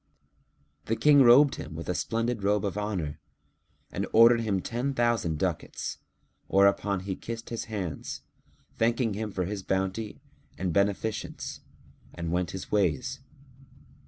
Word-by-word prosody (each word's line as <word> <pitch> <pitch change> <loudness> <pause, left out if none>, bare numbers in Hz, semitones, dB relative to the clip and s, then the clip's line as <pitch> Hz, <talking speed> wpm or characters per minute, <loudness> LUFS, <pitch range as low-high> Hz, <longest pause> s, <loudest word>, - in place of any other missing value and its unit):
The 115 - 0
King 145 +3 +6
robed 130 +3 +7
him 80 - -7
with 80 - -6
a 90 - 0
splendid 115 +4 -1
robe 105 +1 +1
of 100 - -2
honour 100 -8 -3 0.7
and - - -2
ordered 115 +1 +7
him 105 -4 0
ten 125 +8 -2
thousand 120 -10 +1
ducats, - - -3 0.5
whereupon 100 0 +3
he 95 0 -3
kissed 115 +3 -7
his 115 - -3
hands, 95 -9 -5 0.5
thanking 115 0 +1
him 110 +1 -3
for 90 -2 -2
his 100 +1 -4
bounty 95 +3 -2 0.4
and 90 -2 -2
beneficence, 100 +2 -1 0.6
and 85 -1 -4
went 90 -1 0
his 95 +2 -7
ways. 105 - +1
105 Hz, 135 wpm, -28 LUFS, 95-115 Hz, 0.7 s, robed